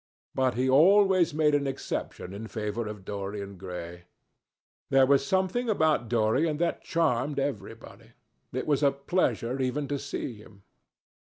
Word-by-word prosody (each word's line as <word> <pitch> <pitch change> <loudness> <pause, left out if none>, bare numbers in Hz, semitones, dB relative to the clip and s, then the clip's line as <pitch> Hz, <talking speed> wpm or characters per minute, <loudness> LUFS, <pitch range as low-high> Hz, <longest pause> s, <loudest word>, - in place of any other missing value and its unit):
But 130 -2 +1
he 130 +2 +1
always 185 +5 +5
made 150 0 +2
an 145 -1 +1
exception 130 -7 -5
in 110 +3 -7
favour 110 0 -3
of 105 -3 -8
Dorian 100 0 -5
Gray. 90 -2 -8 0.8
There 135 -1 +5
was 140 +1 +3
something 190 - 0
about 155 - +2
Dorian 120 +8 +1
that 170 +1 -1
charmed 145 -4 0
everybody. 115 -3 -5 0.4
It 130 - -3
was 145 -2 +1
a 140 - +5
pleasure 135 - -1
even 135 +3 -1
to 145 -1 -1
see 140 -2 -5
him. 105 -2 -16
130 Hz, 145 wpm, -28 LUFS, 110-150 Hz, 0.8 s, always